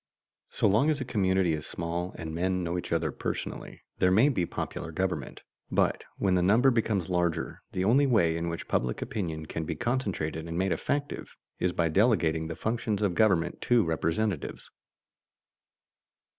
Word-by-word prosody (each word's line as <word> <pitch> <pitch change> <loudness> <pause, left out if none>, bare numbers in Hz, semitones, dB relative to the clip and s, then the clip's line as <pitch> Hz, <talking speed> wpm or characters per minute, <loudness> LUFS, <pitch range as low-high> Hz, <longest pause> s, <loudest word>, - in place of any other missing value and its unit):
So - - +1
long 110 +10 +4
as 150 -2 +1
a 130 - -3
community 95 -7 +2
is 75 -2 -4
small 85 +2 -3
and 80 -1 -5
men 90 +2 0
know 85 +1 -2
each 90 - -4
other 80 -2 +1
personally, - - -5 0.2
there 90 - +4
may 110 +10 +5
be 90 -11 0
popular - - -5
government, - - -3 0.3
but - - +1
when 95 -2 +1
the 90 - +3
number 115 +9 +5
becomes 110 -6 0
larger 90 -3 -1
the 90 - 0
only 135 +7 +4
way 90 -10 +3
in 85 0 -2
which 85 - -5
public 60 -1 0
opinion 80 -7 -4
can 80 +1 -4
be 80 +1 -3
concentrated 90 - -2
and 85 0 -4
made 95 +1 +1
effective 145 - -2 0.2
is 90 - +1
by 85 -1 +1
delegating 80 -5 +2
the 80 - -5
functions 110 +1 -1
of 100 -4 +2
government 90 -3 +2
to 120 -3 +4
representatives. 85 +3 -2
90 Hz, 170 wpm, -28 LUFS, 85-110 Hz, 0.3 s, may